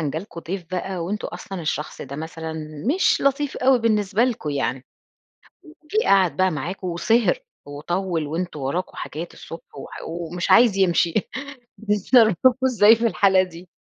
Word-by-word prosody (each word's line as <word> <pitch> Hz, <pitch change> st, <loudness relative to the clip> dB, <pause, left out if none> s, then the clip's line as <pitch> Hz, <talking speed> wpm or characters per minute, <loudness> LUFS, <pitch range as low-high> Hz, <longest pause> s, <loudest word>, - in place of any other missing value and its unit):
مثلًا 150 Hz, -3 st, -1 dB
جا 155 Hz, -, -3 dB
لكم 170 Hz, -1 st, -9 dB
ضيف 180 Hz, +2 st, -5 dB
بقى 185 Hz, 0 st, -3 dB
وأنتم 205 Hz, +5 st, -3 dB
أصلًا 190 Hz, -3 st, -7 dB
الشخص 150 Hz, -1 st, -4 dB
ده 140 Hz, -, -8 dB
مثلًا 160 Hz, +1 st, -6 dB, 0.4 s
مش -, -, +3 dB
لطيف 275 Hz, +1 st, 0 dB
أوي 260 Hz, 0 st, +4 dB
بالنسبة 215 Hz, -1 st, +2 dB
لكم 225 Hz, -12 st, -2 dB
يعني، 135 Hz, -2 st, -2 dB, 0.8 s
وجِه 320 Hz, +6 st, -3 dB
قعد 190 Hz, -3 st, +4 dB
بقى 185 Hz, 0 st, +3 dB
معاكم 175 Hz, +5 st, -5 dB
وسِهِر 225 Hz, -, +2 dB, 0.3 s
وطوِّل 165 Hz, +3 st, -3 dB
وأنتم 160 Hz, 0 st, -4 dB
وراكم 165 Hz, +8 st, -3 dB
حاجات 165 Hz, +4 st, -6 dB
الصبح 165 Hz, -, -11 dB
وح -, -, -9 dB
ومش 170 Hz, +1 st, -4 dB
عايز 230 Hz, -4 st, +6 dB
يمشي، 175 Hz, -3 st, +2 dB, 0.6 s
بتتصرفوا 220 Hz, +2 st, +4 dB, 0.2 s
إزاي 225 Hz, -2 st, +6 dB
في 230 Hz, -, 0 dB
الحالة 195 Hz, -4 st, +4 dB
دي؟ 180 Hz, -1 st, -9 dB
185 Hz, 150 wpm, -22 LUFS, 165-220 Hz, 0.8 s, عايز